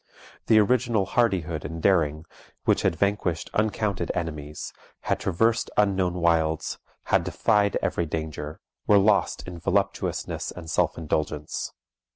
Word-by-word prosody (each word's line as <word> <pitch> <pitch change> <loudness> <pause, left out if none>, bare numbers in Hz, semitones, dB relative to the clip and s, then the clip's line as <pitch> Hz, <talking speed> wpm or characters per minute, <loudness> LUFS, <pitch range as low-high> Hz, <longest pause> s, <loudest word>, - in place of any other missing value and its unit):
The 110 - +6
original 115 -1 +3
hardihood 90 -9 0
and 80 +2 -5
daring, 80 -3 +2 0.4
which - - +3
had - - +1
vanquished 100 -2 -1
uncounted 105 -4 0
enemies, 75 -3 -5 0.3
had - - -1
traversed 115 +5 +1
unknown 95 -3 +2
wilds, 80 -2 +1 0.3
had - - +5
defied 100 0 +2
every 85 - 0
danger, 75 -1 -5 0.3
were 105 - +6
lost 100 -2 +2
in 90 -1 -7
voluptuousness - - -1
and 80 -2 -8
self - - +1
indulgence. 75 -1 -2
85 Hz, 125 wpm, -26 LUFS, 80-100 Hz, 0.4 s, The